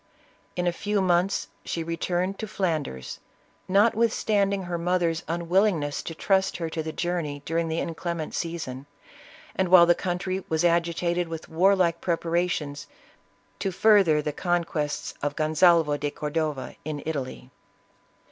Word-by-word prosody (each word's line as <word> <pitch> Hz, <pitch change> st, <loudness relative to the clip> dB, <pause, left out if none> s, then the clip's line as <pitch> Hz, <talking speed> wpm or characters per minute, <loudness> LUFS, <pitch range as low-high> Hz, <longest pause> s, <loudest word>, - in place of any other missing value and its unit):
In 180 Hz, -, -1 dB
a 175 Hz, -, +3 dB
few 205 Hz, +3 st, -1 dB
months, 185 Hz, +1 st, +1 dB, 0.2 s
she 165 Hz, -, -3 dB
returned 175 Hz, +3 st, -2 dB
to 220 Hz, -, -4 dB
Flanders, 160 Hz, -, -3 dB, 0.5 s
notwithstanding 205 Hz, -1 st, +2 dB
her 175 Hz, -1 st, -3 dB
mother's 170 Hz, -1 st, +1 dB
unwillingness 170 Hz, -3 st, +1 dB
to 165 Hz, -, -7 dB
trust 190 Hz, +3 st, +1 dB
her 165 Hz, -2 st, -4 dB
to 160 Hz, -, -2 dB
the 160 Hz, 0 st, -4 dB
journey 155 Hz, -4 st, -3 dB
during 165 Hz, +1 st, 0 dB
the 160 Hz, 0 st, -2 dB
inclement 170 Hz, -1 st, -3 dB
season, 150 Hz, -6 st, -4 dB, 0.7 s
and 190 Hz, -, +1 dB
while 175 Hz, -1 st, +9 dB
the 175 Hz, -, +5 dB
country 185 Hz, +1 st, -3 dB
was 160 Hz, +2 st, +1 dB
agitated 170 Hz, +1 st, +1 dB
with 165 Hz, -1 st, -7 dB
warlike 175 Hz, 0 st, +3 dB
preparations 170 Hz, -4 st, -1 dB, 0.7 s
to 195 Hz, -, -1 dB
further 185 Hz, -6 st, +4 dB
the 150 Hz, -, -2 dB
conquests 165 Hz, -4 st, -1 dB
of 145 Hz, 0 st, -2 dB
Gonsalvo 155 Hz, -1 st, +4 dB
de 145 Hz, 0 st, -2 dB
Cordova, 150 Hz, -2 st, -3 dB
in 150 Hz, -2 st, -5 dB
Italy. 135 Hz, -4 st, -5 dB
170 Hz, 135 wpm, -26 LUFS, 155-185 Hz, 0.7 s, while